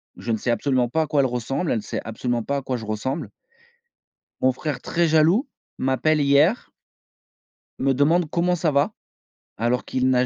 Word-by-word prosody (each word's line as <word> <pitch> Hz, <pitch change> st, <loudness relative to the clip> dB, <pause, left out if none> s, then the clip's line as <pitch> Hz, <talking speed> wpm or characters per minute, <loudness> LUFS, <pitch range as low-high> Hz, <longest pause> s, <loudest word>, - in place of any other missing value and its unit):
Je 120 Hz, -, -4 dB
ne 110 Hz, -, +1 dB
sais 120 Hz, -, -1 dB
absolument 125 Hz, 0 st, +1 dB
pas 160 Hz, +7 st, 0 dB
à 155 Hz, -, -1 dB
quoi 145 Hz, -2 st, +2 dB
elle -, -, +2 dB
ressemble, 130 Hz, +6 st, -2 dB
elle -, -, +1 dB
ne -, -, -3 dB
sait -, -, -4 dB
absolument 120 Hz, +1 st, -2 dB
pas 140 Hz, +5 st, -1 dB
à 140 Hz, -, -3 dB
quoi 130 Hz, -1 st, -3 dB
je 110 Hz, -, -8 dB
ressemble. 120 Hz, +8 st, -3 dB, 1.1 s
Mon 130 Hz, -, +4 dB
frère, 145 Hz, 0 st, -4 dB
très 170 Hz, 0 st, +1 dB
jaloux, 165 Hz, -, +3 dB, 0.3 s
m'appelle 145 Hz, +4 st, +1 dB
hier 145 Hz, +10 st, +3 dB, 1.1 s
me 135 Hz, 0 st, +2 dB
demande: 155 Hz, +5 st, +2 dB
«Comment 180 Hz, +2 st, +1 dB
ça 160 Hz, -2 st, 0 dB
va?», 140 Hz, 0 st, +1 dB, 0.6 s
alors 120 Hz, +3 st, 0 dB
qu'il 130 Hz, 0 st, 0 dB
n'a 125 Hz, 0 st, +3 dB
135 Hz, 185 wpm, -23 LUFS, 125-155 Hz, 1.1 s, Mon